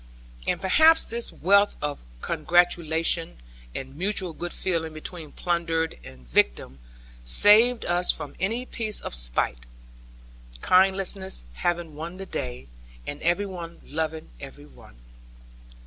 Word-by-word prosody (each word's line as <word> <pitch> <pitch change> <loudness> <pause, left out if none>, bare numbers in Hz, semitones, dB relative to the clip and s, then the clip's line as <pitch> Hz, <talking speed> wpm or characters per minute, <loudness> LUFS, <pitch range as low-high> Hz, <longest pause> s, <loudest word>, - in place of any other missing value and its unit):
And - - +1
perhaps 315 - +5
this 235 +1 -1
wealth 200 +4 +3
of 145 -1 -4 0.2
congratulation, 165 -1 +1 0.4
and 135 +1 -6
mutual 185 0 -1
good 175 +2 -6
feeling 165 -4 -2
between 155 0 -8
plundered 165 - -1
and 65 -1 -14
victim, 60 +1 +1 0.4
saved 215 - +5
us 175 +1 +3
from 150 -3 -7
any 225 +7 -1
piece 220 -4 -1
of - - -6
spite; - - +2 1.0
kindliness 190 - +2
having 170 - -2
won 165 +4 -7
the 195 - -6
day, 65 - -5 0.4
and 145 - -6
every 175 +4 +1
one 170 -3 -8
loving 160 - -4
every 75 - -10
one. 65 -3 -17
170 Hz, 120 wpm, -25 LUFS, 150-190 Hz, 1.0 s, perhaps